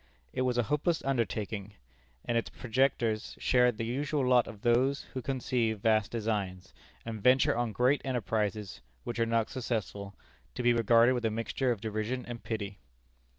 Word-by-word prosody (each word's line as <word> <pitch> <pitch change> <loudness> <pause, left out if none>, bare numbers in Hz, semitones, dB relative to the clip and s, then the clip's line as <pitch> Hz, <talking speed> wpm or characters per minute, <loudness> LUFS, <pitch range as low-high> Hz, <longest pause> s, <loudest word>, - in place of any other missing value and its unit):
It - - -1
was 125 -1 +1
a 120 - +3
hopeless 150 - 0
undertaking; 105 -5 -2 0.5
and 120 - -1
its 115 - 0
projectors 120 -3 0
shared 125 -3 +3
the 115 - -2
usual 140 +3 -1
lot 125 -2 +4
of 100 - -10
those 125 +4 +2
who 130 - -3
conceive 120 -4 -1
vast 110 -2 +3
designs, 105 -5 -3 0.3
and 110 -2 -5
venture 125 +3 +4
on 120 -1 -1
great 125 +6 +2
enterprises, 110 -5 -2 0.2
which 120 0 -4
are 115 - +2
not 115 -1 +1
successful, 105 -5 -4 0.4
to 125 - -3
be 120 0 +5
regarded 115 +2 +5
with 120 -1 -2
a - - +3
mixture 115 +4 -1
of 110 -4 -3
derision 110 +3 -3
and 120 -1 -7
pity. 105 -3 -4
115 Hz, 165 wpm, -30 LUFS, 110-125 Hz, 0.5 s, be